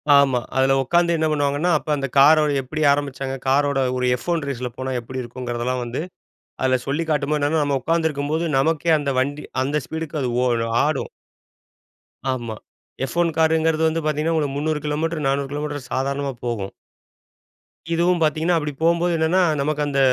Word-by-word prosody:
ஆமா, 135 -3 +4 0.2
அதில 135 +1 +3
உட்கார்ந்து 170 +4 +2
என்ன 160 0 +1
பண்ணுவாங்கன்னா? 145 +3 +1
அப்ப 155 - -8
அந்த 135 -1 -2
காரோட 150 +1 +6
எப்டி 155 +4 -5
ஆரம்பிச்சாங்க? 135 -2 -3
காரோட 140 +1 +2 0.2
ஒரு 125 - 0
எஃப் 125 - -11
ஒன் 165 -3 0
ரேஸி 130 -3 -4
ல - - -2
போனா 130 0 -3
எப்டி 130 +2 -6
இருக்குங்கிறதெல்லாம் 120 +1 -3
வந்து, 120 +5 -4 0.6
அதில 130 -1 +3
சொல்லிக் 160 +4 -1
காட்டும்போது 150 0 0
என்னன்னா, 150 +2 +1
நம்ம 140 -2 0
உட்காந்துருக்கும்போது 160 0 0
நமக்கே 165 +3 +2
அந்த 140 -2 -1
வண்டி, 145 +3 -2 0.2
அந்த 145 +1 -1
ஸ்பீடுக்கு 160 -1 -4
அது 125 - -1
ஓ, 125 - +2 0.4
ஆடும். 150 -3 -1 1.2
ஆமா. 120 -3 -4 0.5
எஃப் 170 - -8
ஒன் 170 -1 +2
காருங்கிறது 160 0 +2
வந்து 160 +1 -1
பார்த்தீங்கன்னா, 155 +2 0
ஒரு 145 - 0
300 150 +1 -1
கிலோமீட்டர், 155 +1 -1
400 135 0 0
கிலோமீட்டர் 145 -3 -4
சாதாரணமா 140 +1 -1
போகும். 105 -5 -3 1.2
இதுவும் 175 +1 +2
பார்த்தீங்கன்னா, 160 +2 +2
அப்டி 150 -1 -4
போம்போது 170 +1 +2
என்னென்னா, 160 +4 +2 0.2
நமக்கு 150 +1 -1
அந்த 140 -1 0
145 Hz, 160 wpm, -22 LUFS, 135-160 Hz, 1.2 s, காரோட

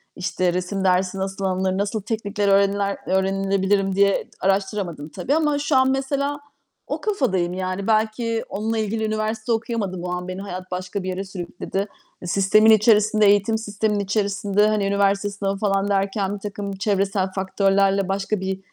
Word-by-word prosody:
işte, 180 -1 -1
resim 185 +2 -2
dersi 185 +1 +2
nasıl 195 +1 -3
alınır, 190 0 0
nasıl 205 +2 -1
teknikler 205 -2 -2
öğreniler 200 0 +2
öğrenebilirim 195 0 +1
diye 200 0 +3 0.2
araştıramadım 190 -5 -1
tabii. 195 - -1
Ama 300 -2 +1
şu 290 0 0
an, 260 0 +4
mesela, 280 +2 -1 0.5
o - - -3
kafadayım, 190 - 0
yani. 185 +2 -3
Belki 225 +1 +1
onunla 220 +3 -2
ilgili 220 +1 -1
üniversite 215 +1 -2
okuyamadım. 220 -6 -2
O 180 - -3
an 180 0 -4
beni 185 +1 -5
hayat 185 -2 -7
başka 185 +1 -4
bir 185 - -3
yere 185 +1 -3
sürükledi. 190 +1 -4 0.3
E, 175 - -7
sistemin 200 +5 +5
içerisinde, 215 0 +4
eğitim 205 +2 +4
sisteminin 210 -1 -1
içerisinde, 205 0 +1
hani, 215 -2 +1
üniversite 200 0 +1
sınavı, 200 -1 -3
falan, 195 -1 +1
derken 195 0 0
birtakım 205 0 -5
çevresel 195 -1 0
faktörlerle 195 0 +2
başka 195 +1 -1
bir, 190 0 -3
200 Hz, 155 wpm, -22 LUFS, 190-215 Hz, 0.5 s, sistemin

